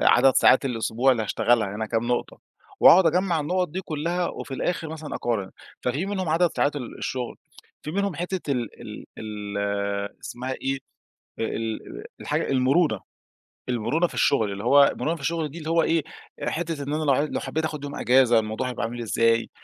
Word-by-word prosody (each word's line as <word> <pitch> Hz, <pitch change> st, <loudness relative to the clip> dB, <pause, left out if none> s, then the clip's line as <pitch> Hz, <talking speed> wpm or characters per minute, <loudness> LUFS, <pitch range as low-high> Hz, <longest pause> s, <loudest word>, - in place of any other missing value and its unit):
عدد 130 Hz, +1 st, +5 dB
ساعات 130 Hz, -, +5 dB
الأسبوع 125 Hz, +1 st, +2 dB
اللي 115 Hz, -, -1 dB
هاشتغلها 110 Hz, -1 st, +1 dB
هنا 110 Hz, 0 st, -2 dB
كام 115 Hz, +2 st, -1 dB
نقطة، 120 Hz, 0 st, -2 dB, 0.4 s
وهاقعُد 180 Hz, 0 st, +8 dB
أجمّع 175 Hz, -1 st, +2 dB
النقط 180 Hz, +4 st, 0 dB
دي 185 Hz, +5 st, -4 dB
كلّها 170 Hz, +1 st, -2 dB
وفي 135 Hz, -, -6 dB
الآخر 165 Hz, +2 st, -2 dB
مثلًا 160 Hz, -1 st, -6 dB
أقارن، 105 Hz, -6 st, -2 dB, 0.3 s
ففي 140 Hz, +10 st, -1 dB
منهم 190 Hz, -4 st, -2 dB
عدد 170 Hz, +2 st, +3 dB
ساعات 145 Hz, +1 st, +1 dB
ال 125 Hz, -4 st, -6 dB
الشُغل، 130 Hz, -2 st, -3 dB, 0.5 s
في 150 Hz, -, -5 dB
منهم 200 Hz, 0 st, -1 dB
حتة 180 Hz, -1 st, -3 dB
ال 120 Hz, -4 st, -4 dB
ال -, -, -8 dB
ال 100 Hz, -1 st, -3 dB
اسمها 130 Hz, +2 st, -5 dB
إيه -, -, -5 dB
دي 135 Hz, -1 st, -5 dB, 0.6 s
آآ، -, -, 0 dB
ال 110 Hz, 0 st, -3 dB
ال -, -, -8 dB, 0.2 s
الحاجة -, -, -1 dB
المرونة، 135 Hz, -, +3 dB, 0.7 s
المرونة 150 Hz, +9 st, +1 dB
في -, -, -13 dB
الشُغل 110 Hz, -7 st, +2 dB
اللي 100 Hz, +2 st, -6 dB
هو 140 Hz, +3 st, +7 dB
المرونة 165 Hz, +2 st, -1 dB
في 150 Hz, -, -11 dB
الشُغل 160 Hz, +1 st, -1 dB
دي 170 Hz, -, -9 dB
اللي 160 Hz, -1 st, -5 dB
هو 165 Hz, -1 st, +3 dB
إيه 165 Hz, -1 st, +2 dB, 0.4 s
آآ، -, -, -1 dB
حتة 160 Hz, -3 st, -3 dB
إن 145 Hz, +2 st, -3 dB
أنا 155 Hz, -, -1 dB
لو 145 Hz, -, +3 dB
ع 135 Hz, -, +2 dB
لو 150 Hz, -, -2 dB
حبيت 160 Hz, +1 st, -2 dB
آخُد 150 Hz, -2 st, -4 dB
يوم 145 Hz, 0 st, -5 dB
أجازة، 125 Hz, -2 st, +4 dB
الموضوع 110 Hz, +4 st, -2 dB
هيبقى 125 Hz, -, -4 dB
عامل 120 Hz, +1 st, -5 dB
إزاي؟ 115 Hz, 0 st, +2 dB
135 Hz, 195 wpm, -25 LUFS, 115-160 Hz, 0.7 s, وهاقعُد